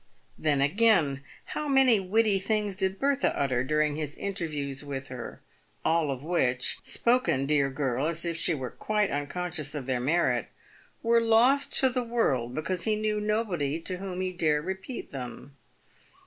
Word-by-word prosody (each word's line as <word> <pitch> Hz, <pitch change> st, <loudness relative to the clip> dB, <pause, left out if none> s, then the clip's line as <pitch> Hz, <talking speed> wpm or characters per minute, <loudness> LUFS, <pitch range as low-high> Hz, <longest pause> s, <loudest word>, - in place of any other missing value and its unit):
Then, 145 Hz, -3 st, 0 dB
again, 155 Hz, -4 st, +3 dB, 0.2 s
how 300 Hz, -, -4 dB
many 265 Hz, -5 st, +5 dB
witty 200 Hz, +1 st, +2 dB
things 210 Hz, 0 st, 0 dB
did 190 Hz, 0 st, -1 dB
Bertha 280 Hz, +2 st, +1 dB
utter 130 Hz, -3 st, +1 dB
during 150 Hz, +2 st, +1 dB
his 150 Hz, -1 st, -4 dB
interviews 150 Hz, -8 st, -3 dB
with 135 Hz, -2 st, -5 dB
her, 125 Hz, -1 st, -8 dB, 0.4 s
all 165 Hz, -2 st, +2 dB
of 135 Hz, -1 st, -4 dB
which 130 Hz, -7 st, +1 dB
— -, -, -27 dB
spoken, 235 Hz, -, +1 dB
dear 140 Hz, -1 st, +2 dB
girl, 135 Hz, 0 st, -1 dB
as 170 Hz, +1 st, -1 dB
if 170 Hz, -1 st, -2 dB
she 165 Hz, 0 st, +1 dB
were 130 Hz, -3 st, -5 dB
quite 210 Hz, -1 st, -1 dB
un 145 Hz, 0 st, -2 dB
conscious 175 Hz, -4 st, -3 dB
of 140 Hz, -3 st, -4 dB
their 130 Hz, -1 st, -1 dB
merit 160 Hz, +7 st, +1 dB, 0.3 s
— -, -, -30 dB
were 230 Hz, 0 st, +4 dB
lost 240 Hz, +5 st, +4 dB
to 265 Hz, -, +5 dB
the 250 Hz, 0 st, -1 dB
world, 135 Hz, -, -1 dB
because 170 Hz, +3 st, -2 dB
he 215 Hz, -1 st, +2 dB
knew 215 Hz, 0 st, -1 dB
nobody 190 Hz, -9 st, -1 dB
to 180 Hz, +2 st, -2 dB
whom 185 Hz, -1 st, -5 dB
he 185 Hz, 0 st, -2 dB
dare 155 Hz, -4 st, +1 dB
repeat 190 Hz, -, -6 dB
them. 135 Hz, +1 st, -8 dB
170 Hz, 175 wpm, -28 LUFS, 140-215 Hz, 0.4 s, many